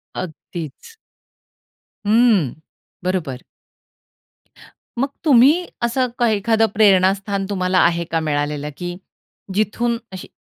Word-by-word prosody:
अगदीच. 170 - -8 1.1
हं, 215 - +4 0.5
बरोबर. 165 -9 -2 1.6
मग 270 - +1 0.2
तुम्ही 275 +1 +6 0.3
असं 250 +2 +1
का 240 - +3
एखादं 220 +2 +2
प्रेरणास्थान 195 -1 +3
तुम्हाला 185 -2 +1
आहे 170 0 +1
का 165 - +1
मिळालेलं 150 -1 -2
की 175 -1 -5 0.6
जिथून 225 +4 0
अशी 185 - -8
195 Hz, 90 wpm, -20 LUFS, 170-230 Hz, 1.6 s, तुम्ही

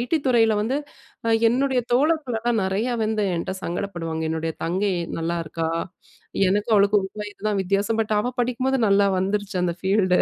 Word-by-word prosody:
ID 250 +7 0
துறையில 225 -3 +4
வந்து, 240 +6 0 0.5
அ - - +2 0.2
என்னுடைய 260 +1 +1
தோழர்களலாம் 245 -5 +1
நெறையா 210 +6 0
வந்து 215 -1 0
என்ட 170 - -3
சங்கடப்படுவாங்க. 170 -3 -3
"என்னுடைய 160 0 -2
தங்கை 190 +4 0 0.3
நல்லாயிருக்கா. 165 -1 -2 0.8
எனக்கும் 210 +3 +1
அவளுக்கும் 200 0 +4
1 190 - -15
வயது 205 0 -10
தான் 205 - 0
வித்தியாசம். 200 +4 0
பட் 215 0 -2
அவ 245 +3 -2
படிக்கும்போது, 255 +2 0
நல்லா 200 0 +4
வந்துருச்சு 195 0 -1
அந்த 175 -1 0
ஃபீல்டு. 190 -1 +2
205 Hz, 155 wpm, -23 LUFS, 185-240 Hz, 0.8 s, துறையில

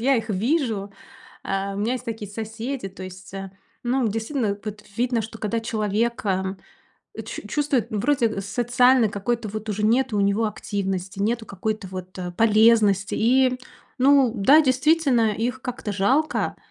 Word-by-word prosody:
я 265 +3 +3
их 225 -1 -3
вижу. 220 - 0 0.5
А, 195 0 -2
у - - -5
меня 215 +5 0
есть 255 - -5
такие 225 -4 -5
соседи. 225 +3 -5
То 190 0 -10
есть, 185 +1 -10
а, 195 -1 -6 0.3
ну, 250 0 +1
действительно, 220 0 -1
вот 215 0 -7
видно, 240 0 +1
что 220 +1 -8
когда 220 +2 -1
человека, 210 -3 -1 0.6
м, - - -6
чу - - -6
чувствует, 285 -5 0
ну, 215 - -1
вроде, 245 +1 +2
э, 215 -3 -4
социальной 245 +3 +3
какой-то 215 +2 -2
вот 215 +1 -6
уже 210 0 -2
нету 235 +1 +2
у - - +2
него 200 +3 +2
активности, 195 -2 -4
нету 220 +3 0
какой-то 215 0 -4
вот, 185 0 -8
э, 180 -1 -4
полезности. 215 -1 +4
И, 255 +2 +3 0.4
ну 270 -2 +5
да, 265 +8 +6
действительно, 260 -4 +3
их 245 +4 -2
как-то 245 -4 -4
жалко. 265 +11 +1
220 Hz, 160 wpm, -23 LUFS, 200-250 Hz, 0.6 s, да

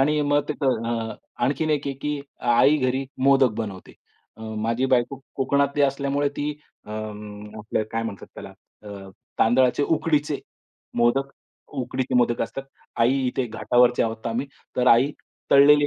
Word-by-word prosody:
आणि 150 +2 +3
मग 145 0 +2
ते - - -1
अ, 115 -3 -1 0.3
आणखीन 155 +4 0
एक 145 -2 0
आहे, 140 - -2
की 150 +1 -3 0.2
आई 120 +5 +4
घरी 130 +1 0 0.2
मोदक 135 -2 +5
बनवते. 100 -4 -6 0.4
अ, - - -16
माझी 110 +3 -1
बायको 130 +1 +1 0.2
कोकणातली 140 +1 +1
असल्यामुळे 140 +1 +1
ती 145 +1 -1 0.4
अं, 105 -1 -7
आपलं 110 +1 -2
काय 115 - -1
म्हणतात 110 -5 -6
त्याला - - -8 0.4
अ, 100 -1 -9 0.3
तांदळाचे, 125 +4 +3
उकडीचे 150 -1 +1 0.6
मोदक 135 +4 +2 0.4
उकडीचे 130 0 -2
मोदक 120 -1 +2
असतात. 135 - -5 0.3
आई 120 +3 +3
इथे 125 0 -1
घाटावरचे 120 +2 +3
आहोत 110 0 -3
आम्ही 120 +4 -1 0.3
तर 125 - +1
आई 125 +5 +5 0.4
तळलेले 145 +1 +7
130 Hz, 145 wpm, -24 LUFS, 115-140 Hz, 0.6 s, तळलेले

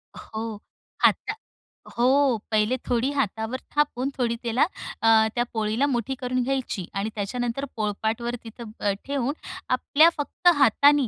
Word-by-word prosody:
हो. 220 -1 -6 0.4
हाता - - +3 0.6
हो. 260 +1 +4
पहिले 215 +3 +2
थोडी 245 +3 +1
हातावर 235 -2 -2 0.2
थापून 280 -3 +1
थोडी 235 -2 +1
त्याला 235 +2 +2 0.4
अ, 225 -1 +5
त्या 240 - +2
पोळीला 220 +4 +1
मुठी 260 -1 -1
करून 255 0 0
घ्यायची. 255 -8 -2
आणि 200 +2 -2
त्याच्यानंतर 245 +5 -2
पोळपाटवर 220 +3 -2
तिथं 230 -1 -9
अ, 205 - +1
ठेवून, 275 -1 -1 0.4
आपल्या 290 +5 +5
फक्त 290 +4 -2
हातानी, 285 +1 +5
240 Hz, 130 wpm, -25 LUFS, 220-270 Hz, 0.6 s, अ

